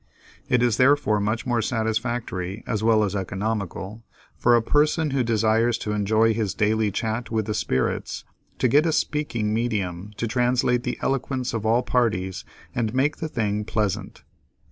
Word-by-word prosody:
It 125 -1 +3
is 120 -4 +2
therefore 130 -5 +3
much 110 +3 -1
more 120 -2 +1
satisfactory 110 -4 -2
as 105 -3 -2
well 110 -1 +4
as 100 -1 -1
economical, 100 +2 -3 0.3
for 120 - +4
a 120 - +4
person 150 +3 +2
who 135 -1 +1
desires 115 0 +2
to 105 - -4
enjoy 110 +2 +2
his 105 -4 -2
daily 110 0 +2
chat 110 +4 -3
with 110 -2 -1
the 105 - -2
Spirits, 65 -10 -1 0.3
to - - +2
get 145 +7 +4
a 160 - +1
"speaking 120 -10 -1
medium" 105 -5 -2
to - - -1
translate 125 +1 +1
the - - -3
eloquence 130 -1 -1
of 110 -1 -2
all 120 +3 +3
parties 95 -7 0 0.3
and 115 -1 -1
make 140 +3 +1
the 160 - -4
thing 105 -5 -1
pleasant. 105 -2 -2
110 Hz, 165 wpm, -24 LUFS, 105-125 Hz, 0.3 s, well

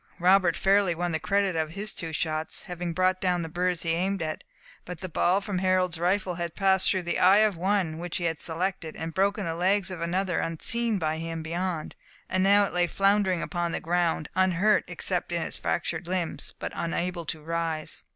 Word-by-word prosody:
Robert 180 -1 +4
fairly 195 -2 +3
won 175 +1 -1
the 160 - -1
credit 200 0 +1
of 160 -1 -1
his 205 +2 -2
two 165 -2 -5
shots, 155 0 -2
having 175 -1 -4
brought 185 +2 +1
down 180 -2 +1
the - - -4
birds 175 +1 -1
he 165 - 0
aimed 190 +4 0
at; 155 0 -4 0.4
but 180 -2 -8
the 185 - -5
ball 180 +3 +2
from 195 -2 -2
Harold's 185 -2 +1
rifle 185 +1 +1
had 170 -1 -4
passed 190 -1 +3
through 185 -2 0
the 175 - -1
eye 190 +3 +6
of 215 -1 +4
the 165 - -12
one 185 -4 0
which 175 0 -4
he 175 - -4
had 165 -2 -1
selected, 170 -1 -3
and 160 0 -5
broken 200 +2 +1
the 165 - -2
legs 190 +3 +1
of 180 -3 -6
another 180 +1 0
unseen 225 +7 0
by 155 -3 -1
him 165 0 -4
beyond, 170 0 -3 0.3
and 185 - 0
it 195 - +3
now 200 0 +5
lay 175 0 +1
floundering 195 -1 +2
upon 175 -2 -2
the - - -1
ground 170 -2 0
unhurt, 185 +3 +3
except - - -1
in - - 0
its - - -5
fractured 175 - -2
limbs, 180 -2 -3
but - - -5
unable 175 +1 -2
to 160 0 -3
rise. 165 -1 -3
180 Hz, 210 wpm, -27 LUFS, 165-190 Hz, 0.4 s, eye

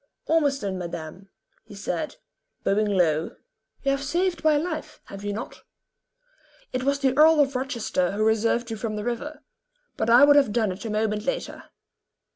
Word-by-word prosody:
"Ormiston, 275 - 0
madame," 170 +2 -7 0.3
he 205 - -13
said, 305 - -4 0.5
bowing 210 +2 +2
low. 165 -5 +1 0.5
"You 275 - +2
have 275 0 -1
saved 345 +3 -1
my 310 -1 +4
life, 315 0 -4
have 195 0 -10
you 205 - -2
not?" 220 +5 -7 1.1
"It 255 - -1
was 280 +1 +1
the 265 -2 +1
Earl 310 +2 +6
of 275 -2 +2
Rochester 235 -8 -1
who 215 +1 0
reserved 225 +2 +1
you 225 - -3
from 215 0 -3
the 210 - -4
river; 285 +5 -4 0.5
but 220 - -1
I 240 +4 +7
would 290 0 +6
have 275 -7 +4
done 220 -2 +1
it 190 +5 -8
a - - -3
moment 215 0 -1
later." - - -4
235 Hz, 170 wpm, -25 LUFS, 205-285 Hz, 1.1 s, I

